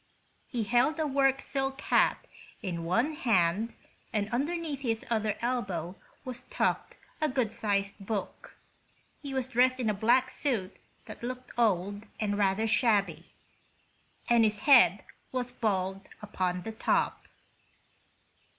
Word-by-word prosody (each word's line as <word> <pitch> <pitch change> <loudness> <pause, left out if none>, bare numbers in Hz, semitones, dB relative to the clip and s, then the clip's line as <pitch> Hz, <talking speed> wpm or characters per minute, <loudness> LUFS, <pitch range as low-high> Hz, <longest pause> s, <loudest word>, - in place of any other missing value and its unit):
He 240 -3 -2
held 245 +9 +2
a 315 - +1
work 270 -1 +2
silk 270 -1 -3
hat - - +2 0.4
in 170 -4 -3
one 230 - +1
hand 220 - +1 0.4
and 210 -3 0
underneath 295 +2 -2
his 225 -4 -2
other 215 -2 0
elbow 195 -8 -2 0.3
was 250 -1 -6
tucked - - -1 0.2
a 310 - +2
good 255 -5 0
sized 200 -1 -1
book. 205 -1 -5 0.7
He 280 - -6
was 265 -2 -1
dressed 255 +1 +3
in 225 -4 +1
a - - -2
black 245 +5 +3
suit 220 -10 -2 0.3
that - - -10
looked 255 +1 -6
old 205 -2 0
and 205 -2 0
rather 200 +1 +2
shabby, 220 -3 +1 1.0
and 235 -1 +5
his 215 -1 +1
head 205 - +6 0.3
was 250 -1 -2
bald 195 -4 -2
upon 185 -4 -2
the 225 - -5
top. 220 - 0
225 Hz, 130 wpm, -29 LUFS, 200-255 Hz, 1.0 s, head